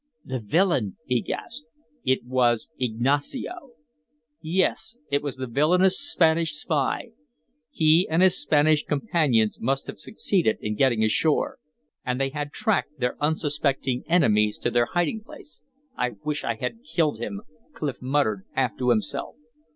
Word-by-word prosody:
"The 130 -1 -3
villain!" 120 - +1
he 125 -2 +1
gasped. 265 +3 -6 0.4
It 130 -2 +1
was 120 -1 +1
Ignacio! 145 - -1 0.7
Yes, 185 +7 0
it 140 0 +2
was 145 -2 -4
the 130 0 -4
villainous 175 +9 +3
Spanish 165 - +2
spy. 150 - -1 0.6
He 160 +3 +3
and 165 +3 +3
his 185 -2 +5
Spanish 150 0 +3
companions 140 - +1
must 135 +3 0
have - - -8
succeeded 185 - 0
in 105 - -3
getting 115 0 +2
ashore. 145 +8 +1 0.4
And 125 0 -2
they 135 0 +1
had 145 +1 -4
tracked 175 -5 -1
their 125 -1 0
unsuspecting 145 -4 0
enemies 105 -11 +3
to - - +1
their 120 -1 +2
hiding 175 - -1
place. 270 - -14 0.3
"I 125 0 -1
wish 150 -1 -2
I 115 - -1
had 125 - -5
killed 160 - 0
him!" 100 -4 -5 0.3
Clif 140 -5 -4
muttered 125 -7 0
half 125 -6 0
to 125 -1 +1
himself. 120 +4 -1
145 Hz, 145 wpm, -25 LUFS, 125-165 Hz, 0.7 s, his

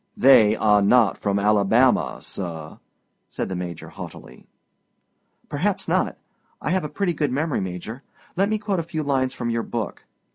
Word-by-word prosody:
"They 110 -5 +6
are 105 -2 +3
not 110 +1 +4
from 100 -1 0
Alabama, 105 +5 +3
sir," 80 -5 -6 0.5
said - - -4
the 95 - -3
Major 90 -2 -6
haughtily. - - -11 1.0
"Perhaps - - -1
not. - - 0 0.4
I - - -2
have 185 -1 +1
a 150 - -4
pretty 190 0 -1
good 150 -4 -1
memory, 150 +2 -1
Major; 95 +7 -6 0.3
let 195 +3 +2
me 215 - +1
quote 205 -3 -2
a - - +1
few 160 -1 -4
lines 135 -2 0
from 120 -1 -2
your 115 0 0
book. 115 -3 -5
120 Hz, 160 wpm, -23 LUFS, 100-150 Hz, 1.0 s, They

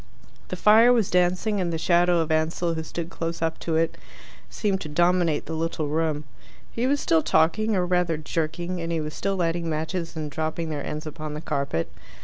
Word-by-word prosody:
The - - -4
fire 225 +3 +6
was 230 -6 +2
dancing, 180 +3 +2
and 175 -2 -1
the 165 - -1
shadow 175 +1 +3
of 160 0 -2
Ansell, 160 +2 +1
who 160 - -3
stood 165 +1 -5
close 165 0 -4
up 160 0 -1
to 165 - -2
it, 165 0 +1 0.5
seemed 195 -3 -1
to 155 - -5
dominate 175 0 +2
the 160 - -5
little 160 -2 -2
room. 155 -1 0 0.5
He 240 +2 -1
was 285 +2 +2
still 160 -9 +3
talking, 215 +9 +2
or 180 -1 +1
rather 180 -2 +1
jerking, 165 +3 -3
and 165 0 -3
he 165 - 0
was 155 -1 -4
still 195 0 -1
lighting 170 -2 -1
matches 165 +2 -3
and 155 -2 -4
dropping 160 +2 -2
their 145 -2 -3
ends 150 +1 -5
upon 155 0 -6
the - - -4
carpet. 140 - -2
165 Hz, 200 wpm, -25 LUFS, 155-180 Hz, 0.5 s, fire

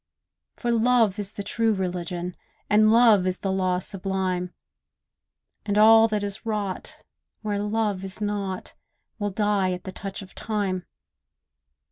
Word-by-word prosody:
For 240 - -2
love 230 -3 +3
is 205 -1 -1
the 200 - -5
true 225 +1 +1
religion, 180 -1 -3 0.4
And 215 +1 +5
love 225 -5 +5
is 185 0 -1
the 195 - -2
law 185 -1 +1
sublime; 185 -1 -1 1.1
And 205 -1 -1
all 225 +1 +7
that 210 -2 -1
is 200 +1 -4
wrought, 210 -4 -4 0.4
where 205 -1 -1
love 210 -2 -1
is 190 +1 -5
not, 205 -3 -3 0.5
Will 205 -1 -1
die 200 -2 +1
at 180 - -6
the 190 - -6
touch 195 +1 -6
of 185 - -15
time. 200 -4 -2
200 Hz, 140 wpm, -25 LUFS, 185-215 Hz, 1.1 s, all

